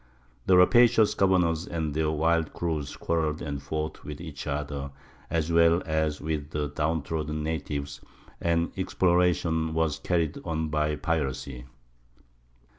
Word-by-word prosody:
The 95 Hz, -, +6 dB
rapacious 115 Hz, +3 st, +6 dB
governors 90 Hz, -4 st, +2 dB
and 80 Hz, -3 st, -2 dB
their 80 Hz, 0 st, +1 dB
wild 80 Hz, +1 st, +1 dB
crews 80 Hz, -5 st, -3 dB
quarreled 80 Hz, -2 st, -1 dB
and 70 Hz, -2 st, -4 dB
fought 75 Hz, +2 st, -4 dB
with 75 Hz, -1 st, -7 dB
each 80 Hz, -3 st, -7 dB
other 70 Hz, -1 st, -3 dB, 0.4 s
as 80 Hz, 0 st, 0 dB
well 85 Hz, +1 st, +4 dB
as 80 Hz, -2 st, 0 dB
with 75 Hz, -2 st, -3 dB
the 75 Hz, -1 st, -2 dB
downtrodden 75 Hz, 0 st, -2 dB
natives, 75 Hz, -3 st, -4 dB, 0.4 s
and 85 Hz, 0 st, +1 dB
exploration 85 Hz, -3 st, +1 dB
was 80 Hz, -3 st, 0 dB
carried 85 Hz, -4 st, 0 dB
on 80 Hz, -2 st, -2 dB
by 75 Hz, 0 st, 0 dB
piracy. 70 Hz, -5 st, -2 dB
80 Hz, 125 wpm, -27 LUFS, 75-85 Hz, 0.4 s, The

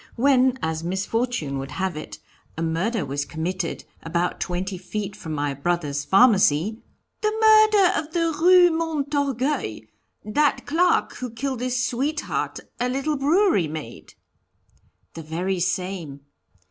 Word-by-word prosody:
When, 260 Hz, 0 st, +3 dB
as 160 Hz, 0 st, -2 dB
misfortune 190 Hz, -, -2 dB
would 135 Hz, 0 st, -6 dB
have 185 Hz, +2 st, -2 dB
it, 155 Hz, -, -7 dB, 0.4 s
a 165 Hz, -, -2 dB
murder 175 Hz, +5 st, -1 dB
was 140 Hz, +1 st, -2 dB
committed 170 Hz, +3 st, -4 dB, 0.2 s
about 170 Hz, +2 st, -2 dB
twenty 185 Hz, +2 st, -3 dB
feet 195 Hz, +2 st, -5 dB
from 160 Hz, -, -8 dB
my 145 Hz, -1 st, -1 dB
brother's 145 Hz, -1 st, -2 dB
pharmacy 200 Hz, -, +4 dB, 0.2 s
" -, -, -51 dB
"The 425 Hz, -, +1 dB
murder 430 Hz, -3 st, +6 dB
of 310 Hz, 0 st, -7 dB
the 330 Hz, -1 st, 0 dB
Rue 360 Hz, -1 st, +7 dB
Montorgueil 285 Hz, -, -1 dB, 0.4 s
that 275 Hz, +4 st, +1 dB
clerk 350 Hz, +4 st, +1 dB
who 250 Hz, -, -5 dB
killed 255 Hz, +2 st, -4 dB
his 255 Hz, 0 st, 0 dB
sweetheart, 290 Hz, +5 st, -2 dB, 0.2 s
a 245 Hz, +1 st, 0 dB
little 275 Hz, +4 st, -1 dB
brewery 295 Hz, -, +2 dB
maid?" 155 Hz, 0 st, -8 dB, 1.0 s
"The 165 Hz, -, -7 dB
very 175 Hz, +4 st, -2 dB
same. 175 Hz, -5 st, -3 dB
215 Hz, 135 wpm, -23 LUFS, -, 1.0 s, Rue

